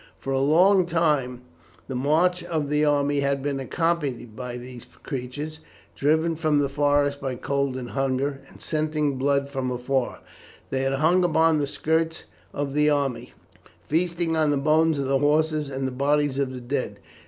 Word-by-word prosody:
For 135 - -4
a 135 - +1
long 180 +6 +4
time 150 -7 0 0.4
the 135 - -5
march 160 +7 +2
of 160 -4 -2
the 150 +1 +2
army 145 -1 +2
had 140 -1 0
been 140 -1 -1
accompanied 135 -6 -2
by 125 0 -6
these 125 -1 -10 0.2
creatures. 145 +3 -5 0.4
Driven 160 +3 +1
from 155 -2 +1
the 145 -1 +1
forest 145 0 +1
by 135 -2 -3
cold 140 0 -1
and 125 -2 -6
hunger, 135 +1 -1
and - - -16
scenting 155 -3 -1
blood 140 +1 +1
from 135 -2 -2
afar, 125 +1 -2 0.5
they 130 - 0
had 135 0 0
hung 160 +6 +3
upon 160 -2 +3
the 145 - 0
skirts 160 +2 -1 0.3
of 140 -1 -3
the 150 +1 +3
army, 135 -5 -1 0.6
feasting 170 +1 0
on 155 -1 +2
the 145 - +2
bones 155 +2 +3
of 140 - -1
the 135 0 +1
horses 150 0 +1
and 135 -1 -3
the - - -4
bodies 140 +1 +1
of 135 -2 0
the 130 -1 -7
dead. 130 +2 -3
145 Hz, 175 wpm, -25 LUFS, 135-155 Hz, 0.6 s, long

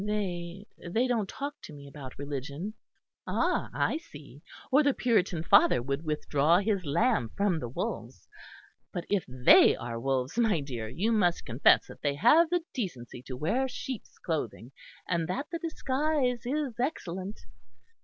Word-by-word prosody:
"They 195 -3 -3
they 220 +8 0
don't 230 -6 0
talk 285 +1 -6
to - - -10
me 140 -1 -11
about 140 -2 -10
religion." 140 +7 -5 0.5
"Ah! - - 0
I - - 0
see; 145 - -13 0.3
or 280 +3 +6
the 285 -2 +2
Puritan 190 -9 +1
father 145 - +5
would 140 +5 -3
withdraw 150 +1 +2
his 200 -1 0
lamb 180 - +1
from 195 -5 +2
the 120 - -5
wolves. 120 - -5 0.6
But 175 - -4
if 200 -3 +2
they 125 0 +6
are 115 -1 -5
wolves, 135 - -1
my 220 -8 +3
dear, 120 -6 -5
you 185 - 0
must 180 -6 +2
confess 120 +3 +4
that - - -13
they 145 -1 0
have 300 - +5
the 350 -1 0
decency 125 - -5
to 130 - -5
wear 220 - 0
sheep's 260 -2 -7
clothing, 130 - -4 0.4
and 170 -2 0
that 255 +11 -2
the 335 - -3
disguise 275 -6 -1
is 275 -4 -2
excellent." 195 - -3
180 Hz, 155 wpm, -29 LUFS, -, 0.6 s, or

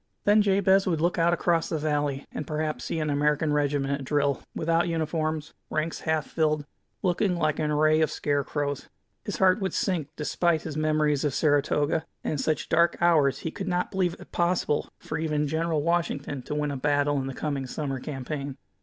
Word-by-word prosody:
Then 210 +1 +5
Jabez 195 -1 +3
would 165 -4 +1
look 175 +2 +1
out 170 +1 +4
across 170 -1 +1
the 160 - -1
valley, 145 -2 -1
and 150 - -5
perhaps 155 0 -2
see - - -2
an 155 -2 0
American 150 +1 +1
regiment 145 -1 +1
at 140 -1 -3
drill, 140 -1 +1
without 165 +1 +1
uniforms, 155 -2 -2 0.2
ranks 155 +1 -2
half 160 -2 0
filled, 155 -2 0 0.4
looking 185 +1 +1
like 155 -3 0
an 155 -1 0
array 155 +1 +3
of 155 - +3
scarecrows. 145 0 -2 0.4
His - - -3
heart 185 +1 +4
would 190 - -1
sink, 175 -7 0
dfespite 160 +1 +1
his 155 -3 -5
memories 155 -2 +1
of 145 -3 0
Saratoga; 145 +1 +2 0.2
and - - -1
in 155 - -1
such 155 +2 0
dark 170 +1 +3
hours 155 -6 +3
he 160 - -3
could 195 - -6
not 180 -1 0
believe 185 -3 0
it - - -13
possible 175 -4 0 0.3
even 150 -1 0
for 145 - -4
General 160 -2 0
Washington 150 -5 -1
to 150 - -5
win 150 -1 -1
a 140 - -3
battle 145 +1 +1
in 135 - -3
the 135 - -5
coming 140 -3 -2
summer 135 -1 -3
campaign. 140 0 -5
155 Hz, 190 wpm, -27 LUFS, 145-170 Hz, 0.4 s, Then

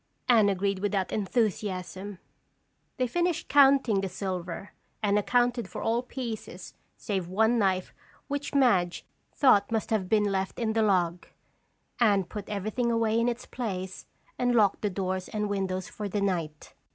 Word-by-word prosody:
Anne 220 -5 +5
agreed 195 0 0
without 200 -1 -1
enthusiasm. 200 -3 -2 0.8
They 255 - +1
finished 345 +7 -1
counting 270 -7 +5
the 195 - -3
silver 185 0 -5 0.3
and 205 0 +3
accounted 245 0 +1
for 180 - -6
all 230 +2 +1
pieces 230 -7 -7 0.2
save 190 -4 -3
one 220 +6 +2
knife 190 -3 0 0.3
which 285 0 -4
Madge 195 -11 +2 0.3
thought 235 -7 +4
must 225 -1 -1
have 195 -4 0
been 215 -1 +3
left 195 -2 -1
in 220 -2 -1
the 225 - +2
log. 180 -4 +1 0.7
Anne 205 -5 +4
put 200 +3 -8
everything 215 +4 -1
away 230 -1 +2
in 235 +1 +2
its 240 +1 -5
place 190 -6 -5 0.3
and 245 -1 +2
locked 205 -4 +3
the 210 - 0
doors 185 -1 -3
and 210 -1 -2
windows 190 -2 -2
for 210 -1 -6
the 205 - -1
night. 170 -6 -2
205 Hz, 150 wpm, -28 LUFS, 190-235 Hz, 0.8 s, Anne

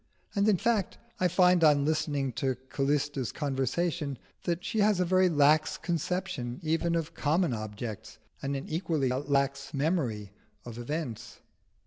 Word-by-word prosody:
And, 200 0 +3
in 200 - +4
fact, 215 -2 0 0.2
I 185 - +3
find 180 0 +4
on 145 -2 +5
listening 150 -3 0
to 130 +2 -1
Callista's 140 -2 0
conversation, 145 +2 -1 0.3
that 175 0 -1
she 220 - -1
has 205 -2 +3
a 180 - +2
very 185 +1 +4
lax 150 0 +3
conception 170 -7 -3
even 165 +2 +1
of 165 0 -2
common 160 0 +1
objects, 110 0 -6 0.2
and 140 0 -2
an 135 - -5
equally 160 -5 0
lax 140 +1 -1
memory 135 - -1 0.3
of 120 -1 -8
events. 120 -4 -5
150 Hz, 140 wpm, -29 LUFS, 135-175 Hz, 0.3 s, on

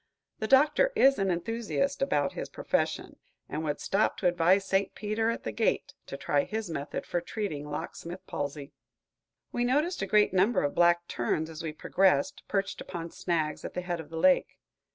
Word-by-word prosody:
The 220 - -2
Doctor 300 - +5
is 275 - +5
an 195 -1 +1
enthusiast 230 +10 -1
in 145 - +2
his - - -6
profession, - - -2 0.3
and 155 - -4
would 150 -2 -2
stop 200 +3 +1
to 185 - +1
advise 180 +3 +3
St. 195 0 0
Peter, 215 +2 -1
at 230 - -3
the 110 - -3
gate, 105 - 0
to 140 - -6
try 145 +1 +1
his 215 -3 -4
method 145 -2 -4
for 175 - -1
treating 170 -6 -4
locksmith 170 +4 -6
palsy. 145 0 -5 0.8
We 240 - -1
noticed 295 +9 +1
a 195 - -1
great 210 -1 +4
number 195 +6 +3
of 145 - 0
black 175 0 +3
terns 155 +7 -1
as 160 +1 -7
we 160 -1 -3
progressed, 195 - +1
perched 195 -1 -1
upon 170 -2 -6
snags 160 -4 -2
at - - -7
the 180 - -1
head 175 -1 -3
of 155 -2 -9
the 165 - -6
lake. 275 +11 +3
180 Hz, 185 wpm, -29 LUFS, 160-220 Hz, 0.8 s, Doctor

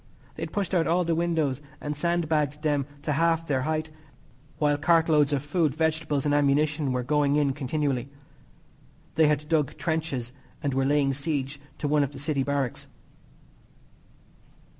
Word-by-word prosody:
They - - -10
had - - -4
pushed 200 -3 -2
out 170 -3 +2
all 175 +2 +2
the 170 -1 0
windows 160 -5 0 0.2
and 150 0 -4
sandbagged 155 -2 0
them 145 -3 +1 0.2
to 150 - -1
half 165 +2 +2
their 135 -4 0
height, 155 +3 -2 0.7
while 145 -1 +2
cart 165 +1 +4
loads 150 -3 +4
of 140 -2 0
food, 150 -1 0
vegetables 155 -3 0
and 145 - +2
ammunition 145 0 +2
were 125 -1 -1
going 145 +1 +2
in 145 -2 +2
continually. 135 -2 -1 1.0
They 160 0 +4
had 150 0 0
dug 155 -4 0
trenches 155 -7 -2 0.3
and 140 -2 0
were 135 0 +1
laying 140 -1 +2
siege 140 -1 -3 0.2
to 150 - -2
one 150 0 +3
of 140 0 -1
the - - -9
city 145 0 -1
barracks. 140 -2 -2
150 Hz, 160 wpm, -26 LUFS, 140-160 Hz, 1.0 s, cart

